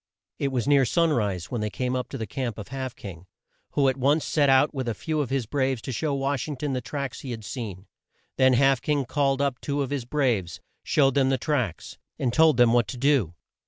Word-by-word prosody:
It 140 - 0
was 130 -2 -2
near 140 -2 +5
sun 165 +6 +2
rise 100 - -2
when 120 -3 -2
they 105 - -1
came 125 +3 -2
to 130 +1 -4
the 115 - -4
camp 120 +1 -4
of 105 - -8
Half 130 -1 -5
King, 95 -3 -10 0.5
who 140 -2 +3
at 130 0 +1
once 145 +4 +2
set 145 -3 +2
out 135 +3 +4
with 130 -3 -3
a 115 - -2
few 155 +6 -2
of 135 - -3
his 135 -3 -1
braves 130 +1 0
to - - -4
show 145 +4 -1
Wash 135 0 -1
ing 145 -3 -5
ton 145 +1 -2
the 130 - -2
tracks 140 +1 -5
he 135 - -8
had 115 -3 -6
seen. 100 -4 -6 0.5
Then 130 -1 +4
Half 135 0 +3
King 145 -3 0
called 140 +1 +1
up 135 -3 -2
two 145 0 -1
of 135 - -6
his 140 -4 -2
braves, 120 - 0 0.2
showed 135 -3 +2
them 135 -1 +3
the 135 - +2
tracks, 125 - -2 0.2
and 120 -2 -1
told 160 -3 +5
them 120 -2 +5
what 120 -2 +3
to 130 - -6
do. 125 - +2
130 Hz, 235 wpm, -25 LUFS, 120-140 Hz, 0.5 s, near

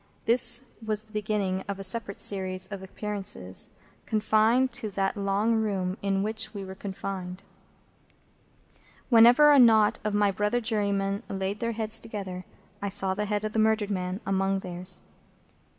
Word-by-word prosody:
This 240 +1 +4 0.2
was 215 -1 -1
the 220 0 -23
beginning 205 -3 -2
of 200 -1 -4
a 195 - -7
separate 200 +1 +2
series 185 -1 +2
of 200 -2 -6
appearances, 190 - -2 0.3
confined 220 +4 +2
to 230 -2 -3
that 195 -1 -2
long 200 +3 0
room 195 -4 -2
in 195 -1 0
which 220 0 -1
we 200 -1 -6
were 190 - -8
confined. 190 -1 -7 1.7
Whenever 245 +5 +7
a 285 - +6
knot 220 -4 +5
of 210 -1 -2
my 205 -1 +2
brother 210 +5 0
jurymen 200 -3 -1
laid 195 +1 -3
their 230 0 -2
heads 220 0 +1
together, 190 -4 -7 0.4
I 200 - -2
saw 195 -1 +3
the 210 +2 -3
head 210 0 -2
of 215 - -4
the 220 - 0
murdered 220 -1 +1
man 185 +1 -3
among 195 0 0
theirs. 180 0 -2
205 Hz, 155 wpm, -27 LUFS, 195-220 Hz, 1.7 s, Whenever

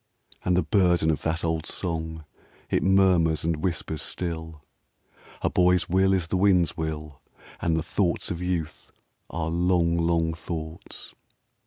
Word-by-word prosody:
And 90 0 +2
the 90 - +3
burden 85 -1 +3
of 75 - -2
that 80 +1 -1
old 80 -2 -1
song, 80 -2 -3 0.5
It - - +2
murmurs 90 -5 +3
and 80 -1 0
whispers 80 -2 -2
still: 80 -3 -4 0.8
"A - - +3
boy's 90 0 +3
will 95 +2 +3
is 95 -3 +1
the 95 - +1
wind's 90 -4 +3
will, 75 -3 -5 0.4
And 80 -1 +1
the 80 - -1
thoughts 85 +1 0
of 85 0 -4
youth 90 -3 -3 0.4
are 80 -1 -3
long, 85 0 +2
long 85 -1 +1
thoughts." 80 0 -7
85 Hz, 145 wpm, -26 LUFS, 80-90 Hz, 0.8 s, the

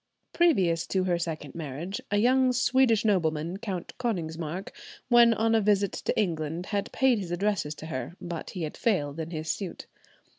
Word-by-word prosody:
Previous 190 - +3
to 190 -1 +1
her 175 -2 +1
second 155 -4 -4
marriage, 165 +5 -5
a 205 - +1
young 255 +4 +4
Swedish 245 -3 +3
nobleman, 165 -3 +1
Count 195 -4 -5
Konigsmark, 170 -6 -3 0.4
when 240 -1 +7
on 225 0 +2
a 225 - +4
visit 200 -1 +2
to - - -2
England, 165 -3 -1
had 200 -1 -2
paid 260 -4 +3
his 185 -4 -5
addresses 175 -4 -1
to 155 - -9
her, 160 +2 -5
but 175 -3 -6
he 180 -4 -5
had 155 - -5
failed 165 - 0
in 160 0 -4
his 155 -2 -2
suit. 195 -4 -6
185 Hz, 175 wpm, -28 LUFS, 160-220 Hz, 0.4 s, when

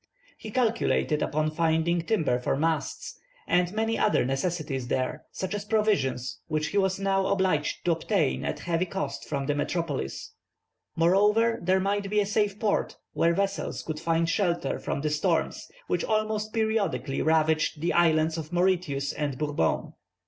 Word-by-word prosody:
He 220 - -9
calculated 225 -9 +1
upon 155 +1 0
finding 165 +2 +1
timber 160 - +1
for 125 - 0
masts, 160 +3 -2 0.3
and 180 0 +2
many 225 +2 -1
other 210 - +3
necessaries 135 -2 -2
there, 130 +1 -2
such 190 - -4
as 205 -1 -3
provisions, 200 - 0
which 155 -1 -1
he 205 - -2
was 190 0 +1
now 195 -1 +1
obliged 185 -7 0
to 175 - +3
obtain 165 -2 0
at - - -3
heavy 170 +1 0
cost 195 +2 -4
from 140 -2 -2
the 145 - +1
metropolis. 145 - -3 0.6
Moreover, 210 +7 +3
there 185 +2 +2
might 200 +1 -1
be 210 +1 +2
a 205 - +2
safe 205 0 0
port, 215 -2 0 0.2
where 170 0 +2
vessels 200 +1 -2
could 155 -1 -4
find 165 0 +1
shelter 170 -4 0
from - - -3
the 150 0 -1
storms 160 +2 0 0.2
which 180 - -1
almost 215 0 -1
periodically 220 - 0
ravaged 155 -1 +2
the 170 +3 0
islands 160 -1 +3
of 155 0 -7
Mauritius 175 -6 +1
and 145 -3 -3
Bourbon. 145 - -1
170 Hz, 155 wpm, -27 LUFS, 155-200 Hz, 0.6 s, other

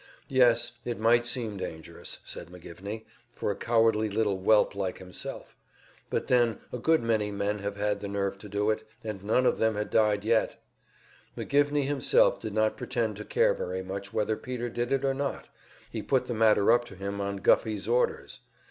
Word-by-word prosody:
Yes, 120 -2 +3
it 120 -1 -3
might 120 +2 +4
seem 115 -5 -3
dangerous, 80 -4 -6
said - - -8
McGivney, 90 +5 -8 0.3
for - - -2
a - - -3
cowardly 115 -1 +2
little 105 -2 0
whelp 105 +3 +4
like 95 -2 -3
himself; 90 -1 -8 0.5
but - - -1
then 120 -2 +3 0.2
a 125 - -3
good 160 +2 +3
many 110 -3 +1
men 100 +1 -1
had 100 0 -4
had 105 0 0
the 100 - -5
nerve 100 0 -2
to 105 - -10
do 105 +2 +1
it, 110 0 -3 0.2
and 105 -4 -5
none 115 +5 +2
of - - +2
them 110 -1 +2
had 105 0 -3
died 105 -2 +2
yet. 115 0 +1 0.8
McGivney 145 0 +2
himself 140 -2 +3
did 110 -2 -6
not 110 0 +2
pretend 115 -4 -1
to 105 - -6
care - - +3
very 95 +1 -4
much 100 +1 -6
whether 110 +1 0
Peter 120 +1 -4
did 120 +1 -2
it 135 0 +1
or 135 - +2
not; 140 0 -3 0.4
he - - -3
put 130 -2 +1
the 120 - -3
matter 110 -1 +4
up 120 +1 +4
to 95 - -12
him 100 +1 -4
on 100 0 -2
Guffey's 105 +1 +2
orders. 120 +2 0
110 Hz, 190 wpm, -28 LUFS, 100-120 Hz, 0.8 s, might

